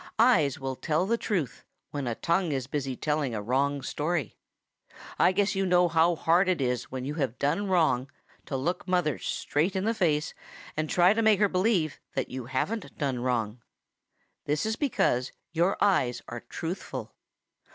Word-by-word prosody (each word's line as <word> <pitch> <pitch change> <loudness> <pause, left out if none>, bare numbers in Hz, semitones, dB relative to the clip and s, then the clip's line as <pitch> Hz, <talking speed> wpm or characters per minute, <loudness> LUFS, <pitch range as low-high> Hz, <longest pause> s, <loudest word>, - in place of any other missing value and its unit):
Eyes 160 - +4
will 135 -1 -3
tell 155 +6 0
the 230 +4 +2
truth 185 - -2 0.3
when 140 -3 -3
a 115 - -1
tongue 170 +3 0
is 135 -3 -1
busy 135 -1 -3
telling 150 -3 -1
a 105 - -2
wrong 140 +4 0
story. 150 -1 -2 0.8
I - - +5
guess 200 +1 +1
you 195 -1 0
know 180 -1 +4
how 165 +1 +3
hard 175 +4 +3
it 180 - +1
is 125 -2 -1
when 130 -1 -4
you 145 - -3
have 130 -3 -1
done 175 +9 0
wrong 155 -8 +2 0.4
to 135 - -2
look 170 +8 -2
mother 175 -6 +1
straight 165 +7 -1
in 190 +1 0
the 225 - +2
face 155 -8 +1 0.4
and 155 0 -2
try 180 +2 +5
to 225 - 0
make 220 -2 +4
her 205 - +5
believe 185 -5 +1 0.2
that - - -2
you 130 -2 -5
haven't 190 - -3
done 135 -5 -1
wrong. 120 -2 -1 0.8
That 150 +4 0
is 220 0 0
because 195 - 0 0.2
your 175 +4 +1
eyes 140 -12 +2
are 120 - -5
truthful. 170 +8 -6
155 Hz, 175 wpm, -28 LUFS, 130-185 Hz, 0.8 s, I